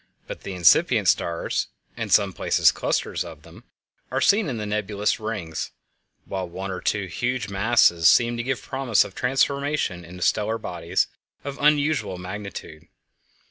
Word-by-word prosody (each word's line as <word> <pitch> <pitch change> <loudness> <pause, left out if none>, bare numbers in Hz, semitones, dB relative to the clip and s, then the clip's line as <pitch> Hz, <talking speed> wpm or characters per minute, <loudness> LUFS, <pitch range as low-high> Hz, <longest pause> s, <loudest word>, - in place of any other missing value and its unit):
But - - -9
incipient 90 -3 +4
stars 85 -1 0 0.3
(in - - -4
some - - +4
places - - +3
clusters - - -1
of - - -11
them) - - -15 0.4
are - - -1
seen 205 -5 +3
in 125 - -3
the 105 - -4
nebulous 105 0 -1
rings, 105 -8 -4 0.6
while 95 -2 -4
one 95 +3 -5
or 90 - -5
two 100 -2 0
huge 120 +5 -2
masses 95 -5 +4
seem 120 0 +4
to 120 - -2
give 130 +1 -3
promise 130 -5 +2
of 95 - -10
transformation 135 -6 0
into 90 +1 -7
stellar 110 +2 +1
bodies 85 -6 -1 0.4
of 140 -1 -6
unusual 150 -8 +2
magnitude. 90 -4 -8
105 Hz, 145 wpm, -24 LUFS, 90-125 Hz, 0.6 s, incipient